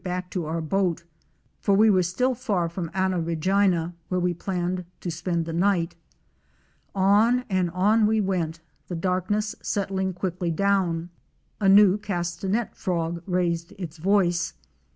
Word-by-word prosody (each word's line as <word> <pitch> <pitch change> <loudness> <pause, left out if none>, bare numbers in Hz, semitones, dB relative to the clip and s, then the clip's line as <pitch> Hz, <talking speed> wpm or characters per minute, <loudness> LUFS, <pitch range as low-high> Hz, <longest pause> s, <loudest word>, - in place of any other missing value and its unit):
back 180 0 -4
to 175 -5 -3
our 165 +1 -2
boat, 175 0 0 0.6
for 200 - +2
we 215 +3 +5
were 190 -4 +5
still 250 +10 0
far 205 -8 -1
from 170 0 -5
Anna 190 -2 0
Regina, 175 +1 +1 0.2
where 185 - 0
we 180 0 +1
planned 180 +1 -2 0.2
to 175 - -4
spend 165 +1 -2
the 165 - -5
night. 170 -1 +1 1.0
On 210 +6 +4
and 185 -2 +1
on 210 +5 +3
we 220 0 +2
went, 170 -5 -1 0.3
the 180 - -4
darkness 190 +5 -1
settling 190 -2 -1
quickly 180 -1 -3
down. 175 -2 0 0.5
A 200 -3 +3
new 200 0 +6
Castanet 190 +3 -2
Frog 170 -2 -2
raised 175 0 -1
its 170 -3 -7
voice. 175 -1 +1
185 Hz, 145 wpm, -25 LUFS, 170-200 Hz, 1.0 s, new